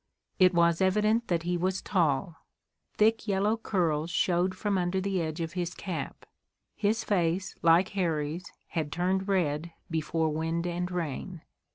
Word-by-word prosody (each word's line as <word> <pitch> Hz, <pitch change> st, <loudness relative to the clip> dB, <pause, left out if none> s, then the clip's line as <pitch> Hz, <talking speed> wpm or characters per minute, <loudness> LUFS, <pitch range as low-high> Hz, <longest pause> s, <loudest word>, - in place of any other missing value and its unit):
It 185 Hz, -1 st, +5 dB
was 170 Hz, 0 st, +3 dB
evident 215 Hz, +5 st, +2 dB
that 170 Hz, -2 st, 0 dB
he 175 Hz, +1 st, 0 dB
was 185 Hz, +2 st, 0 dB
tall. 165 Hz, -2 st, 0 dB, 0.6 s
Thick, 220 Hz, +1 st, +3 dB
yellow 205 Hz, +2 st, +2 dB
curls 170 Hz, -8 st, 0 dB
showed 180 Hz, +1 st, +1 dB
from 205 Hz, +1 st, -1 dB
under 180 Hz, 0 st, 0 dB
the 190 Hz, -1 st, -1 dB
edge 160 Hz, +1 st, -3 dB
of 165 Hz, 0 st, -4 dB
his 175 Hz, -1 st, -3 dB
cap. 170 Hz, -8 st, -5 dB, 0.5 s
His 215 Hz, +2 st, 0 dB
face, 180 Hz, -1 st, 0 dB
like 170 Hz, +3 st, +5 dB
Harry's, 165 Hz, -2 st, -2 dB, 0.2 s
had 155 Hz, -4 st, -2 dB
turned 185 Hz, +4 st, 0 dB
red 170 Hz, -4 st, 0 dB, 0.2 s
before 160 Hz, 0 st, 0 dB
wind 165 Hz, +2 st, -1 dB
and 175 Hz, 0 st, -2 dB
rain. 175 Hz, 0 st, -4 dB
175 Hz, 150 wpm, -29 LUFS, 165-190 Hz, 0.6 s, It